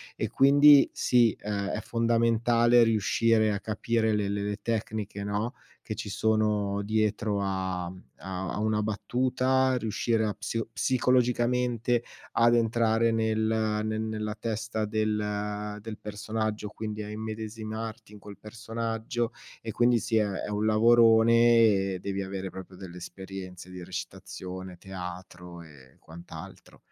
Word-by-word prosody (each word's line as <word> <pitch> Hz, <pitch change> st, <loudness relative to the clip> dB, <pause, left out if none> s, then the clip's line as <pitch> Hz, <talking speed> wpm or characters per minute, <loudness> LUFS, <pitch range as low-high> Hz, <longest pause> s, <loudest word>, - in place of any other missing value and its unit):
e -, -, -2 dB
quindi 145 Hz, +1 st, +6 dB
sì, 120 Hz, -3 st, +3 dB
è 100 Hz, -1 st, -3 dB
è 105 Hz, -, -2 dB
fondamentale 115 Hz, +1 st, +3 dB
riuscire 110 Hz, 0 st, +2 dB
a 100 Hz, -, -2 dB
capire 110 Hz, +1 st, 0 dB
le 105 Hz, -1 st, 0 dB
le 100 Hz, 0 st, -2 dB
le 105 Hz, 0 st, -2 dB
tecniche 110 Hz, -3 st, -3 dB
no, 105 Hz, +5 st, -2 dB, 0.3 s
che 110 Hz, -, -5 dB
ci 105 Hz, -, -6 dB
sono 105 Hz, -1 st, +1 dB
dietro 105 Hz, -1 st, 0 dB
a 95 Hz, -2 st, -2 dB
mhmm, 90 Hz, +1 st, -11 dB, 0.2 s
a 95 Hz, -1 st, -5 dB
a -, -, -3 dB
una 110 Hz, 0 st, +1 dB
battuta, 130 Hz, +4 st, +1 dB
riuscire 115 Hz, 0 st, 0 dB
a 105 Hz, -, -1 dB
psio 110 Hz, +2 st, -4 dB
psicologicamente 125 Hz, -1 st, +1 dB, 0.3 s
ad 120 Hz, 0 st, +4 dB
entrare 115 Hz, 0 st, +2 dB
nel 110 Hz, -1 st, 0 dB, 0.4 s
ne 110 Hz, 0 st, -2 dB
nella 110 Hz, -1 st, -3 dB
testa 110 Hz, 0 st, -3 dB
del 105 Hz, -1 st, -2 dB
del 110 Hz, 0 st, -7 dB
personaggio, 105 Hz, 0 st, -3 dB
quindi 110 Hz, 0 st, -5 dB
a 105 Hz, -, -7 dB
immedesimarti 110 Hz, 0 st, -6 dB
in 105 Hz, -, -12 dB
quel 100 Hz, 0 st, -11 dB
personaggio 115 Hz, +1 st, -3 dB, 0.3 s
e 110 Hz, -, -5 dB
quindi 120 Hz, +1 st, +3 dB
sì, 115 Hz, 0 st, 0 dB
è 105 Hz, -, +3 dB, 0.2 s
è -, -, -6 dB
un 105 Hz, +1 st, -1 dB
lavorone 115 Hz, +1 st, +5 dB, 0.5 s
e 95 Hz, -2 st, -3 dB
devi 100 Hz, +1 st, -3 dB
avere 95 Hz, 0 st, -5 dB
proprio 95 Hz, 0 st, -10 dB
delle 90 Hz, -1 st, -10 dB
esperienze 95 Hz, 0 st, -9 dB
di 90 Hz, -1 st, -8 dB
recitazione, 95 Hz, +1 st, -7 dB
teatro 90 Hz, -1 st, -8 dB
e 70 Hz, -5 st, -17 dB
quant'altro. 85 Hz, +2 st, -12 dB
110 Hz, 135 wpm, -28 LUFS, 100-115 Hz, 0.5 s, quindi